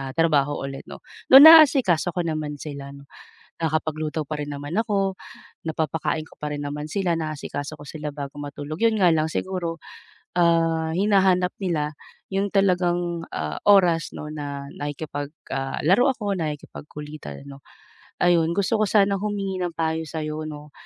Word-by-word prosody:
ah, 135 -1 -5
trabaho 145 -3 +2
ulit 135 0 -6
'no. - - -10 0.3
Though 270 +2 +11
naasikaso 280 - +7
ko 180 - 0
naman 155 -2 -3
sila, 140 -2 -7 0.7
nakakapagluto 155 -1 -2
pa 155 - -4
rin 145 0 -5
naman 145 +5 -5
ako, 195 -4 0 0.5
napapakain 160 0 -1
ko - - -18
pa 150 0 -3
rin 145 - -5
naman 150 +1 -4
sila, 185 -2 0
naasikaso 155 -1 -5
ko 145 - -10
sila 150 0 -5
bago 140 -1 -7
matulog, 145 +2 -6
'yun 230 -1 +4
nga 180 -2 +5
lang 155 0 +1
siguro, 170 -1 -3 0.6
ah, 165 -1 +2
hinahanap 190 -2 +3
nila 155 -5 -1 0.4
'yung 195 +1 0
talagang, 175 -3 +1
ah, - - -3
oras 175 -5 +5
'no 150 - -7
na 140 -2 -6
nakikipag, 145 0 -5 0.2
ah, 135 0 -3
laro 205 - +5
ako, 210 -5 -3
nakikipagkulitan 150 - -7
'no. 140 0 -11 0.6
Ayun 170 -2 +3
gusto 200 +4 +1
ko - - +4
sanang 200 -1 +3
humingi 195 -3 -2
ng 175 - -2
payo 160 0 0
sa'yo 155 0 -4
'no, 150 -1 -10
160 Hz, 150 wpm, -24 LUFS, 150-185 Hz, 0.7 s, Though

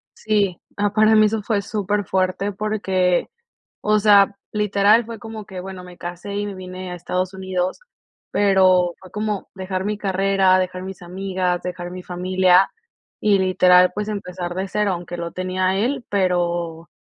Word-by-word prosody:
Sí. 205 -5 0 0.2
Ah, 205 0 0
para 215 +1 +4
mí 215 0 +6
eso 215 0 -1
fue 205 -1 0
súper 205 -1 -1
fuerte 190 +2 0
porque, 190 -4 0 0.5
o 215 0 +2
sea, 200 -1 +5 0.2
literal 210 +2 +3
fue 230 -2 -7
como 220 -1 -8
que, 185 -1 -7
bueno, 185 0 -8
me 180 -1 -13
casé 175 +3 -6
y 205 0 -1
me 200 - -5
vine 185 0 -7
a - - -4
Estados 185 +2 -3
Unidos, 185 -1 -2 0.5
pero 185 -3 +4
fue 185 - -14
como 210 -1 -3
dejar 190 0 -4
mi 210 0 -2
carrera, 195 -1 +2
dejar 185 0 -2
mis 190 -1 -8
amigas, 185 0 -2
dejar 175 -1 -5
mi 185 0 -7
familia, 185 +1 +3 0.5
y 205 -2 +3
literal, 180 -1 +5
pues 210 0 -3
empezar 180 -4 -5
de 190 +1 -3
cero, 210 -1 0
aunque 175 0 -5
lo 170 -1 -5
tenía 185 0 -2
a 190 - +1
él, 245 +3 -1
pero 175 -3 -1
190 Hz, 170 wpm, -21 LUFS, 180-205 Hz, 0.5 s, mí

